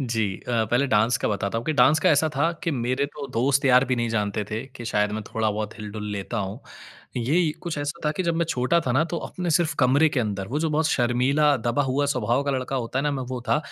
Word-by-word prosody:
जी 115 -4 0 0.2
अ, 115 -2 +1
पहले 125 +4 +2
डांस 115 -1 +3
का - - -1
बताता 100 +1 -1
हूँ, 115 - -6
कि 155 - +1
डांस 140 +2 +5
का - - +4
ऐसा 155 +1 +3
था 155 +4 +2
कि 170 - 0
मेरे 130 +1 -1
तो 145 0 -8
दोस्त-यार 130 +1 +4
भी 130 -1 -1
नहीं 120 -1 0
जानते 105 -2 -1
थे, 110 +4 -3
कि 125 -3 -11
शायद 105 -2 0
मैं 110 +1 -3
थोड़ा-बहुत 110 -1 -1
हिल-डुल 105 0 -6
लेता 100 -1 -4
हूँ। 105 +7 -8 0.6
ये 155 +8 +2
कुछ 170 -3 -4
ऐसा 145 0 -4
था 150 - +2
कि - - 0
जब 170 -2 0
मैं 170 - +1
छोटा 130 +5 +2
था 125 -6 -1
ना, 135 - +3
तो 170 +1 -4
अपने 180 -1 -4
सिर्फ़ 165 -1 +2
कमरे 140 +4 +4
के 140 -4 -1
अंदर, 100 -3 -3
वो 140 - -1
जो 165 - +1
बहुत 155 +1 +1
शर्मीला, 135 +3 +2
दबा 120 +3 0
हुआ 140 +2 0
स्वभाव 125 -1 +1
का 140 - 0
लड़का 130 0 -2
होता 125 +1 -2
है - - 0
ना, 150 - +1
मैं 135 -2 -3
वो 130 -1 -4
था 115 - +3
130 Hz, 255 wpm, -24 LUFS, 115-145 Hz, 0.6 s, डांस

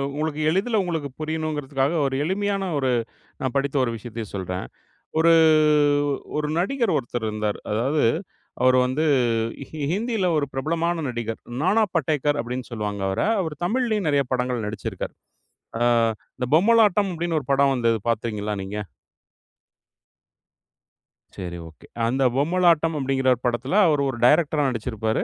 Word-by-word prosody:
உங்களுக்கு 155 0 -2
எளிதில 205 +6 +1
உங்களுக்கு 160 -5 -3
புரியணும்ங்கிறதுக்காக, 155 -2 -1
ஒரு 135 - -3
எளிமையான 195 +2 -1
ஒரு 130 -2 +1 0.5
நான் 130 0 -2
படித்த 140 +1 -1
ஒரு 115 - 0
விஷயத்தையும் 110 -1 -7
சொல்றேன். 90 -6 -4 0.6
ஒரு 165 +1 +5 1.0
ஒரு 150 0 -1
நடிகர் 230 - 0
ஒருத்தர் 120 -3 -3
இருந்தார். 105 -1 -2
அதாவது 135 +7 +1 0.6
அவரு 130 0 +5
வந்து 140 +5 -1 0.9
ஹிந்தில 220 -1 -1
ஒரு 140 - 0
பிரபலமான 165 +4 -1
நடிகர். 115 -2 -4 0.2
"நானா 205 +5 +3
படேகர்" 145 -2 +1
அப்படின்னு 125 +1 -5
சொல்லுவாங்க 105 -3 -4
அவரை. 95 - 0
அவர் 160 -4 -3
தமிழ்லயும் 220 -3 0
நிறைய 140 -1 +3
படங்கள் 125 -3 -1
நடிச்சி 105 -1 -4
ருக்கார். - - -6 0.7
அ - - -4 0.6
இந்த 125 -1 -2
"பொம்மலாட்டம்" 210 0 +4
அப்படின்னு 165 -1 -1
ஒரு 135 - -18
படம் 135 0 +3
வந்தது 115 -2 +1
பார்த்தீங்களா 105 -2 -2
நீங்க? 105 +2 -5 2.6
சரி 90 -2 -5
ஒகே. 80 - -17 0.2
அந்த 130 +3 +1
பொம்மலாட்டம் 165 +1 +2
அப்படின்கிற 135 -1 +1 0.2
படத்தில, 120 +5 -1
அவரு 150 -3 +2
ஒரு 120 - -4
டைரக்டரா 150 +1 +3
நடிச்சிருப்பாரு. 110 -2 -2
140 Hz, 130 wpm, -23 LUFS, 120-170 Hz, 2.6 s, ஒரு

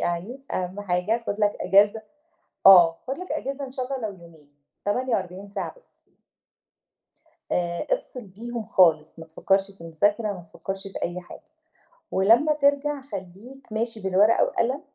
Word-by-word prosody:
يعني 185 +10 -3
أهم 185 +2 -3
حاجة 205 +4 -1
خُد 205 - -3
لك 205 -1 +2
أجازة 205 +3 +4 0.6
آه، 175 -4 +8
خُد 270 - -3
لك 365 - -7
أجازة 280 -2 -3
إن 255 - -10
شاء 255 -1 -4
الله 255 -4 -3
لو 200 - -10
يومين 160 -4 -18 0.3
48 205 -4 -2
ساعة 200 -1 -5
بس. - - -26 1.5
آآ، 175 -1 -1
افصل 250 - -8
بيهم 230 +4 -7
خالص، 160 -7 +3
ما 160 - -9
تفكّرش 195 +4 0
في 195 - -21
المذاكرة، 205 +6 0
ما 190 - -8
تفكّرش 195 +3 -7
في 195 -1 -10
أي 175 +1 -2
حاجة. 175 - -12 0.7
ولمّا 230 +11 +4
ترجع 285 -1 +1
خلّيك 240 +3 -10
ماشي 225 0 -3
بالورقة 195 +3 +3
وقلم 260 +4 0
205 Hz, 150 wpm, -25 LUFS, 180-250 Hz, 1.5 s, آه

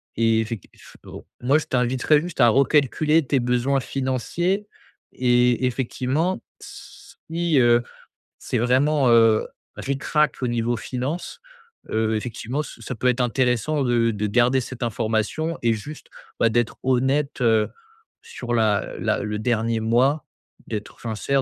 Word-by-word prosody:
et 115 0 +2
effec 110 -3 -6
eff - - -17
au - - -10 0.2
moi 135 +5 +3
je 155 - -3
t'inviterais 130 +4 +2
juste 175 -3 -8
à 120 - +7
recalculer 150 +4 +3
tes 135 +1 +1
besoins 125 +3 +1
financiers 140 - -2 0.4
et 125 0 +2
effectivement, 130 +7 -1 0.2
si, 165 -2 -5
heu, 120 -1 +5 0.6
c'est - - -2
vraiment, 130 +3 +2
heu, 115 -2 +4 0.3
ric-rac 145 +3 0
au - - +1
niveau 120 0 0
finance, 130 - -4 0.5
heu, 110 0 +1
effectivement 125 +5 -4
ç - - -11
ça 125 - -5
peut 125 - -1
être 125 0 +2
intéressant 125 +4 +1
de 115 -1 +2
de 105 0 -2
garder 125 +5 +3
cette 125 0 -7
information 115 +8 -1
et 115 - +3
juste, 145 +8 -8 0.3
bah, 115 - +5
d'être 120 +1 0
honnête, 130 +3 +1
heu, 110 -2 +3 0.5
sur 120 -1 -6
la 110 -3 +1
la - - 0
le 105 0 -3
dernier 115 0 0
mois, 130 +6 +2 0.4
d'être 105 -2 -6
sincère, 120 +4 -1
125 Hz, 140 wpm, -23 LUFS, 115-140 Hz, 0.6 s, à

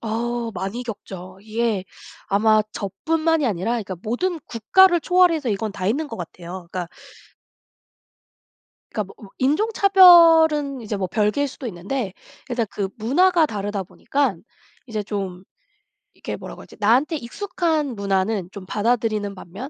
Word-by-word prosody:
어우 235 +1 -2
많이 195 +7 -4
겪죠. 190 -5 -8
이게 220 -3 -1 0.4
아마 215 +2 +4
저뿐만이 315 - 0
아니라 205 +2 -1
그러니까 210 -6 -3
모든 320 +10 -2
국가를 345 - +4
초월해서 335 -5 +3
이건 210 +1 -2
다 185 -1 -4
있는 290 +8 0
것 - - -7
같아요. 175 +1 -8
그니까 180 -2 -3 2.0
그니까 215 - -2
뭐 190 - -14
으 - - -16
인종차별은 325 - +5
이제 210 -1 -3
뭐 190 -1 -2
별개일 210 +9 0
수도 260 - -8
있는데 200 +2 -4 0.4
일단 240 -2 -1
그 200 -2 -3
문화가 320 +9 +3
다르다 205 -3 -3
보니깐 250 0 -2 0.4
이제 215 -3 -3
좀 195 -3 -5 0.7
이렇게 - - -6
뭐라고 - - -9
하지? - - -15
나한테 250 +10 +3
익숙한 310 - -2
문화는 195 -1 -1
좀 200 -3 -9
받아들이는 215 -2 0
반면 195 +9 -9
225 Hz, 315 characters per minute, -22 LUFS, 200-295 Hz, 2.0 s, 인종차별은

